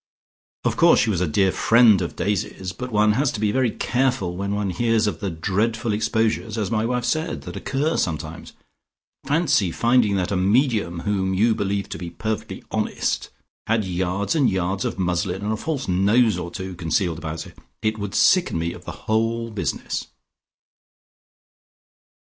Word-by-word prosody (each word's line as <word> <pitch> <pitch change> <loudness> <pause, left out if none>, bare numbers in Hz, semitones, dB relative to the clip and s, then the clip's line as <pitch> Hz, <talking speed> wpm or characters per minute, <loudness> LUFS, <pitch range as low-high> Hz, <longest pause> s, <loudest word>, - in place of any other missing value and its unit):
"Of - - 0
course - - +6
she 110 - +2
was 90 -3 -1
a 90 - +1
dear 95 +5 +2
friend 115 -2 +5
of - - -4
Daisy's, 95 -2 -2
but 125 0 -6
one 105 0 +4
has 130 +5 +1
to - - -4
be 105 -1 +1
very 130 0 +2
careful 125 -7 0
when 100 +2 -2
one 100 -2 -1
hears 115 +1 +1
of 105 - -2
the 100 - -2
dreadful 105 +7 -1
exposures, 110 +1 0
as 105 -1 -2
my 110 0 +1
wife 125 0 -1
said, 155 +7 -1
that - - -8
occur 145 +4 -1
sometimes. 80 0 -3 0.7
Fancy 145 - +2
finding 115 0 +3
that 95 -1 -1
a - - +1
medium 100 -3 +1
whom 95 -2 0
you 110 +4 +3
believed 100 -1 -2
to - - -5
be 90 -2 -5
perfectly 110 +6 -4
honest - - -1 0.4
had 110 -2 +1
yards 95 - -1
and 145 -6 +3
yards 95 +1 -1
of - - -3
muslin 90 +1 -1
and 105 +1 0
a - - 0
false 140 +2 -3
nose 105 +4 +3
or 90 -1 -4
two 95 +1 -6
concealed 85 -1 -1
about 80 0 -5
her. - - -13 0.3
It 110 0 0
would 100 -1 -4
sicken 180 - +4
me 85 +1 -2
of - - -12
the - - -9
whole 115 +1 0
business." 105 - -3
105 Hz, 175 wpm, -23 LUFS, 95-115 Hz, 0.7 s, course